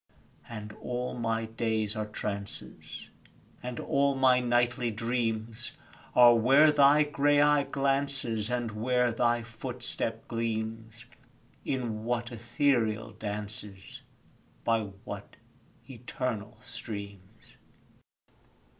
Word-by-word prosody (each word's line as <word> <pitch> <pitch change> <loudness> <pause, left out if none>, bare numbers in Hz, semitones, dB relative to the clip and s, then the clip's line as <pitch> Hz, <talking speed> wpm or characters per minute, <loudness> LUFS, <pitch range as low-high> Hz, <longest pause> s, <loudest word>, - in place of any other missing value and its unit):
And 105 -2 -7
all 125 0 -3
my 115 -2 -1
days 110 -1 -1
are 110 0 -2
trances, 100 -1 -5 0.5
And 125 -1 -5
all 140 0 +2
my 130 -1 +5
nightly 120 0 +1
dreams 115 0 -2 0.4
Are 120 -1 +9
where 135 +7 +6
thy 145 +1 +6
grey 145 0 +2
eye 145 -1 +4
glances, 135 -5 0
And 120 -2 -1
where 125 +3 +1
thy 120 0 +1
footstep 115 -1 -3
gleams 115 0 -3 0.6
In 120 -5 -2
what 120 0 -1
ethereal 120 -1 0
dances, 105 -2 -6 0.6
By 115 -2 +2 0.2
what - - -7 0.5
eternal 115 -4 -4
streams. 100 -2 -8
120 Hz, 95 wpm, -29 LUFS, 110-125 Hz, 0.6 s, Are